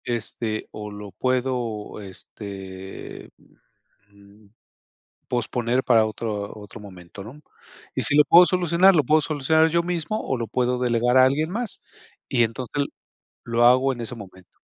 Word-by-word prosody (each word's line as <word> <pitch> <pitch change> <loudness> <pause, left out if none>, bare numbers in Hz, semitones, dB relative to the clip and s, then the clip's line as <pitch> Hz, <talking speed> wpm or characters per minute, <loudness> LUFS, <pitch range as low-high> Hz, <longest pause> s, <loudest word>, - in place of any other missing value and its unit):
Este, 115 -1 -3
o, 105 -1 -7
lo 105 -1 -9
puedo, 125 -2 -2
este, 95 -1 -9 0.8
mm, 100 +1 -21 0.8
posponer 120 +1 -1
para 115 -3 +4
otro 105 -1 -4
otro 105 +2 -11
momento, 95 -1 -11
¿no? 130 +8 -11 0.5
Y - - -1
si 145 - +3
lo 150 - +8
puedo 175 +5 +7
solucionar, 180 +1 +4
lo 150 - +3
puedo 155 +5 +4
solucionar 155 +1 +2
yo 170 +1 +2
mismo, 175 +4 -2
o 130 - -2
lo 115 - -3
puedo 125 0 0
delegar 120 0 +1
a 130 - +8
alguien 150 +5 +1
más, 230 +2 -4 0.5
y 120 -3 +3
entonces 125 +5 -3 0.6
lo 115 0 0
hago 130 +2 +4
en 120 - -8
ese 115 +2 -4
momento. 95 -4 -14
120 Hz, 145 wpm, -23 LUFS, 105-145 Hz, 0.8 s, lo